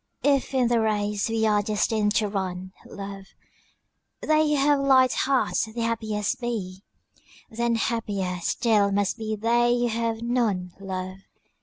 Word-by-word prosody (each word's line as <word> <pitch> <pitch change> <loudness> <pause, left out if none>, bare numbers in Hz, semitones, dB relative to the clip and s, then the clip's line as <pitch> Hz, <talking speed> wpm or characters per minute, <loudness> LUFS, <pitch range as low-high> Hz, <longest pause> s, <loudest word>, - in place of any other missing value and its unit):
If 275 -1 +1
in 255 -2 +3
the 235 -1 +2
race 210 -1 0
we 225 0 0
are 210 -1 +3
destined 210 0 0
to 215 - +2
run, 185 -2 -4
love, 195 -1 -8 1.0
They 310 0 +2
who 300 - +2
have 285 0 +3
light 265 -2 +4
hearts 270 -3 +1
the 220 +2 -8
happiest 220 -2 -2
be, 195 -6 -4 0.7
Then 235 +1 0
happier 205 -6 -2
still 210 +1 +2
must 200 +3 0
be 220 -1 -2
they 240 +3 +2
who 240 0 +1
have 230 0 -2
none, 215 -7 -1
love. 185 -1 -5
220 Hz, 145 wpm, -25 LUFS, 200-240 Hz, 1.0 s, light